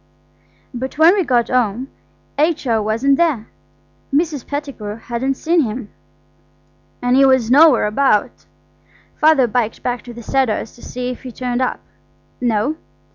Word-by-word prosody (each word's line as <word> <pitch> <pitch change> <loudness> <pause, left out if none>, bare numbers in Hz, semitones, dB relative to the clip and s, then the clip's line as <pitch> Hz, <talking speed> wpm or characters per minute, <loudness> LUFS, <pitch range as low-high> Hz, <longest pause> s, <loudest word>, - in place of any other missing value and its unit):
But 260 +3 -5
when 325 +3 +6
we 400 -2 +1
got 245 -6 +1
home 250 +1 0 0.5
H.O. 290 -8 +1
wasn't 230 +6 +1
there. 300 -11 0 0.6
Mrs. 295 -2 -1
Pettigrew 275 -8 -5
hadn't 240 +4 -3
seen 330 +4 +1
him, 225 -3 -4 1.1
and 245 +1 +2
he 270 - +5
was 260 -4 +3
nowhere 290 -4 +6
about. 210 -1 0 0.7
Father 305 -4 +4
biked 230 -1 -2
back 245 -1 -2
to 245 - -8
the 235 - -9
Cedars 240 -4 -1
to 240 - -17
see 250 0 -5
if 250 - -9
he'd 255 -3 -9
turned 250 0 -2
up. 255 - -1 0.6
No. 245 +5 0
255 Hz, 140 wpm, -18 LUFS, 230-280 Hz, 1.1 s, when